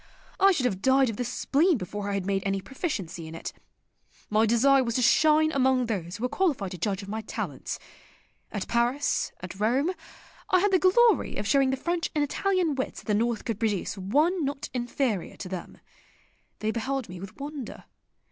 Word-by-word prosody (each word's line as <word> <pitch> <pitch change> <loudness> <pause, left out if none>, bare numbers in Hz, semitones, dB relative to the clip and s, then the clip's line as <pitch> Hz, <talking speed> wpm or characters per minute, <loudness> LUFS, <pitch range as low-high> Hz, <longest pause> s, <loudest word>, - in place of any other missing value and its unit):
I 390 0 +7
should 285 -9 0
have 195 -6 -1
died 265 0 +4
of 210 - -8
the 250 - -1
spleen 300 +7 +2
before 205 +1 -5
I 200 - -1
had 195 -2 -2
made 195 0 0
any 195 0 0
proficiency 190 - -4
in 160 - -8
it. - - -6 0.8
My 215 +1 +4
desire 265 +4 +4
was 235 -2 -2
to 250 - +2
shine 310 +4 +5
among 260 -3 +2
those 190 -5 -3
who 230 - -7
were - - +3
qualified 260 - 0
to 180 - -7
judge 195 +2 -1
of - - -9
my 220 +2 -3
talents. 215 - -5 0.7
At - - -4
Paris, 240 +5 +1
at 185 +1 -8
Rome 255 - +2 0.6
I 370 - +5
had 405 +2 +2
the 375 - +4
glory 415 +3 +4
of 205 - -3
showing 270 +6 +3
the 265 - 0
French 340 +4 -1
and 300 - +2
Italian 360 +2 +1
wits 265 -1 -4
that - - -23
the 215 - 0
North 230 +1 0
could 225 -3 -2
produce 210 -5 -1
one 300 - +1
not 280 +1 -3
inferior 240 -5 -2
to - - -6
them. 185 -2 -6 0.8
They 215 0 0
beheld 260 +2 -2
me 180 0 -8
with 195 +6 -10
wonder. 285 -4 -6
245 Hz, 195 wpm, -27 LUFS, 205-290 Hz, 0.8 s, I